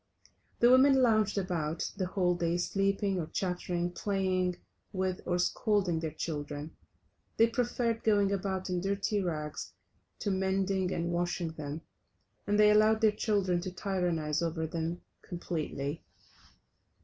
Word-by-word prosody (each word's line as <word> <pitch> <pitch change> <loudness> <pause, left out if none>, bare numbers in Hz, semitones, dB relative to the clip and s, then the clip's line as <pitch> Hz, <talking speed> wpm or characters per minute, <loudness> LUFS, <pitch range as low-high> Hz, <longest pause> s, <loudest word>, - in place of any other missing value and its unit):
The 240 +1 +6
women 265 +1 +6
lounged 215 -3 +3
about 170 -4 -2
the 185 - -2
whole 180 -1 +1
day 175 0 0
sleeping 195 +1 0
or 160 - -3
chattering, 180 -1 -2
playing 185 -2 0 0.3
with, 185 -1 -2
or 175 -1 +1
scolding 180 -1 +1
the 160 -1 -2
children. 150 -1 -5 0.6
They 225 - +7
preferred 235 -1 -1
going 205 -2 +3
about 190 -1 -2
in 180 -1 -1
dirty 200 +2 0
rags 155 -4 -4 0.4
to 205 - -2
mending 190 0 0
and 170 -1 -1
washing 175 -1 -1
them, 150 0 -6 0.7
and 205 0 +2
they 210 0 +7
allowed 215 +1 +4
their 220 -1 +5
children 200 -4 0
to 185 +1 -4
tyrannize 175 -5 -1
over 165 -1 -1
them 165 +2 -3 0.2
completely. 155 -4 -4
185 Hz, 135 wpm, -31 LUFS, 170-200 Hz, 0.7 s, They